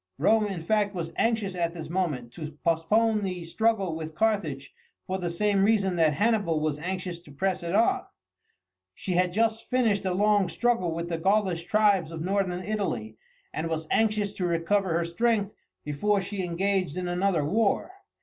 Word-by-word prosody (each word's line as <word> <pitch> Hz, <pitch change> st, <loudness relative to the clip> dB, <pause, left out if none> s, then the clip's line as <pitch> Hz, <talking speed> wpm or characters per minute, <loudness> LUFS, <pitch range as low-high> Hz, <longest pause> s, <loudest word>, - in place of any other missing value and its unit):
Rome, 220 Hz, -1 st, +3 dB
in 185 Hz, -5 st, -5 dB
fact, 205 Hz, +1 st, +1 dB
was 165 Hz, -2 st, -4 dB
anxious 225 Hz, -4 st, 0 dB
at 170 Hz, -1 st, -2 dB
this 160 Hz, -2 st, -6 dB
moment 155 Hz, -9 st, -2 dB
to 155 Hz, -2 st, -7 dB
postpone 210 Hz, +7 st, +2 dB
the 180 Hz, -3 st, -4 dB
struggle 200 Hz, -1 st, 0 dB
with 160 Hz, -1 st, -6 dB
Carthage 155 Hz, -11 st, -1 dB, 0.3 s
for 190 Hz, +1 st, -3 dB
the 175 Hz, -2 st, -2 dB
same 200 Hz, +3 st, +1 dB
reason 200 Hz, -3 st, +2 dB
that 160 Hz, -2 st, +4 dB
Hannibal 205 Hz, -4 st, +1 dB
was 155 Hz, -1 st, -1 dB
anxious 180 Hz, +1 st, -4 dB
to 160 Hz, -4 st, -16 dB
press 185 Hz, +5 st, -1 dB
it 170 Hz, +2 st, -2 dB
on. 305 Hz, -, +3 dB, 0.9 s
She 190 Hz, -, -5 dB
had 180 Hz, +1 st, +3 dB
but 175 Hz, -, -12 dB
just 225 Hz, 0 st, 0 dB
finished 225 Hz, -6 st, +2 dB
a 185 Hz, -1 st, 0 dB
long 205 Hz, -2 st, +3 dB
struggle 230 Hz, -5 st, +1 dB
with 170 Hz, +1 st, -4 dB
the 165 Hz, -1 st, -2 dB
Gaulish 190 Hz, -2 st, +1 dB
tribes 205 Hz, -6 st, +3 dB
of 165 Hz, -1 st, -5 dB
Northern 185 Hz, -1 st, -1 dB
Italy, 120 Hz, -, -3 dB, 0.3 s
and 160 Hz, +1 st, -2 dB
was 160 Hz, -1 st, -2 dB
anxious 210 Hz, -2 st, +1 dB
to 180 Hz, -3 st, -2 dB
recover 175 Hz, +3 st, +1 dB
her 170 Hz, -, 0 dB
strength 210 Hz, +3 st, 0 dB, 0.3 s
before 195 Hz, +8 st, +1 dB
she 195 Hz, 0 st, -4 dB
engaged 180 Hz, -1 st, -1 dB
in 180 Hz, -1 st, -2 dB
another 175 Hz, -3 st, +1 dB
war. 215 Hz, -, +1 dB
185 Hz, 180 wpm, -27 LUFS, 165-210 Hz, 0.9 s, that